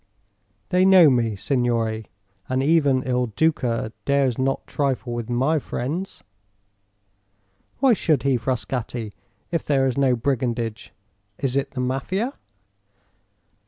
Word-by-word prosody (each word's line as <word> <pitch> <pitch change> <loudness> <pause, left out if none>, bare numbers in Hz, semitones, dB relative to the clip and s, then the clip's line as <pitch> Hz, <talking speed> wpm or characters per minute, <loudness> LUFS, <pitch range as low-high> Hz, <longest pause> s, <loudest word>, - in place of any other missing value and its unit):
They 180 +1 +3
know 185 -5 +7
me, 115 -4 +1
signore, 115 -2 -1 0.4
and 130 +1 0
even 140 -4 +3
Il 125 -1 0
Duca 115 -4 0
dares 140 -4 +1
not 135 +1 -1
trifle 130 -4 -2
with 120 -1 -4
my 135 +6 +1
friends." 150 +9 -4 1.5
"Why 265 -2 +4
should 155 - +1
he, 135 -2 +2
Frascatti, 120 -2 -3 0.4
if 165 - -1
there 135 -2 +2
is 130 0 0
no 130 -2 +3
brigandage? 120 -3 -2 0.5
Is 135 -2 -1
it 140 0 0
the 130 - -4
Mafia?" 185 - -2
130 Hz, 120 wpm, -23 LUFS, 120-145 Hz, 1.5 s, know